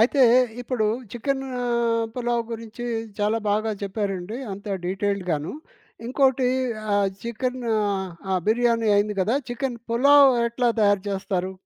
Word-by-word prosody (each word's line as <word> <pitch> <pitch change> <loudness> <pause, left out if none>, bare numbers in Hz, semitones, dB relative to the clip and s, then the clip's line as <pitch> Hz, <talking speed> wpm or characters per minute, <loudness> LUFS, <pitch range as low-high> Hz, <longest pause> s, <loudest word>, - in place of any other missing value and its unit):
అయితే 260 +4 +4 0.4
ఇప్పుడు 240 -3 -1 0.3
చికెన్ 270 +3 -2 0.7
పులావ్ 240 -1 0
గురించి 230 +1 -7 0.3
చాలా 210 +2 +1
బాగా 215 +1 +1
చెప్పారండి. 200 +1 -3
అంతా 200 +1 -6
డీటెయిల్డ్‌ 195 0 -1
గాను. 150 -1 -2 0.5
ఇంకోటి 260 0 +2 0.5
ఆహ్, 200 -1 +3
చికెన్ 250 +2 -3 0.2
ఆహ్, 200 -3 0 0.2
ఆ - - +2
బిర్యానీ 230 -1 +2
అయింది 210 0 +1
గదా! 225 +8 +2
చికెన్ 245 0 -3
పులావ్ 280 +4 +6 0.2
ఎట్లా 235 +1 +1
తయారు 205 -2 +3
జేస్తారు? 190 -1 -2
225 Hz, 125 wpm, -24 LUFS, 200-245 Hz, 0.7 s, పులావ్